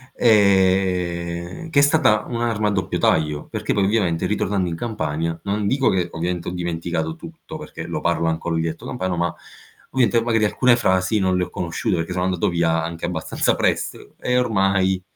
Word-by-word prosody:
ehm, 95 - +2
che 150 - +3
è - - +7
stata 145 -7 +3
un'arma 115 -3 -1
a - - +2
doppio 95 -2 -1
taglio, 75 -2 +1
perché - - -2
poi 100 -2 +2
ovviamente 95 -6 +1
ritornando 95 -2 0
in 85 - -3
Campania, 80 -6 -3
non 100 +1 -1
dico 135 +2 +2
che 90 -2 0
ovviamente 85 +1 -3
ho - - -5
dimenticato 85 -2 -3
tutto, - - -10
perché - - -8
lo - - -3
parlo 85 -1 +1
ancora 80 +1 -1
il 80 - +1
dialetto 80 0 -4
campano, 95 -7 -2
ma 85 0 -1 0.6
ovviamente 120 -2 +3
magari 115 -1 +1
alcune 120 +3 +4
frasi 95 -2 +1
non 95 -1 +1
le 90 - +1
ho 90 - -12
conosciute 85 -2 -2
perché 80 +2 -3
sono 90 0 -1
andato 90 -2 0
via 80 -1 +1
anche 85 0 -4
abbastanza 85 -2 0
presto, - - -2
e 125 0 +1
ormai 95 -5 +2
95 Hz, 180 wpm, -21 LUFS, 85-105 Hz, 0.6 s, è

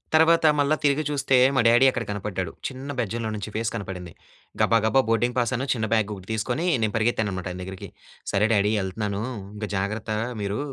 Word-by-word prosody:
తర్వాత 160 +1 +5
మళ్ళా 145 +2 +3
తిరిగి 145 +2 +2
చూస్తే, 140 -2 +1 0.2
మా 130 - +4
డ్యాడీ 120 +3 +6
అక్కడ 120 -2 -3
కనపడ్డాడు. 95 -4 -3 0.2
చిన్న 135 +1 -8
బెజ్జంలో 115 0 -2
నుంచి 105 0 -5
ఫేస్ 115 0 0
కనపడింది. 90 -5 -6 0.5
గబా, 115 - +4
గబా 135 +4 +4
బోర్డింగ్ 120 +2 +1
పాసును, 125 +2 0
చిన్న 110 -2 -2
బ్యాగ్ 105 -2 +1 0.2
తీసుకొని 120 +9 -1 0.2
నేను 110 -1 0
పరిగెత్తాననమాట 110 -5 0
ఆయన 90 - -7
దగ్గరికి. 95 0 -8 0.4
"సరే! 105 +1 +3
డ్యాడీ! 105 +1 +3
వెళ్తున్నాను. 100 +2 -3 0.3
ఇంక 105 0 -4
జాగ్రత్త 105 +3 -3 0.3
మీరూ. 100 +4 -2
110 Hz, 170 wpm, -25 LUFS, 100-125 Hz, 0.5 s, డ్యాడీ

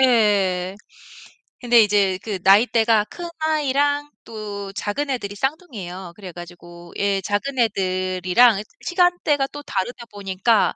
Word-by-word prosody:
예. 200 -7 +3 0.9
근데 240 -1 +5
이제 200 -3 +2
그 205 -4 -3
나이대가 220 +2 +4
큰 350 -1 -8
아이랑 290 -1 +1
또 205 -3 -7
작은 245 +9 -3
애들이 205 -6 -3
쌍둥이예요. 200 - -5
그래 190 -4 -9
가지고 175 0 -12
예, 200 -1 +1
작은 250 +8 -2
애들이랑 185 +1 +2 0.2
시간대가 355 -6 +2
또 290 - -9
다르다 235 +1 -4
보니까 205 +1 +1
210 Hz, 270 characters per minute, -22 LUFS, 190-260 Hz, 0.9 s, 근데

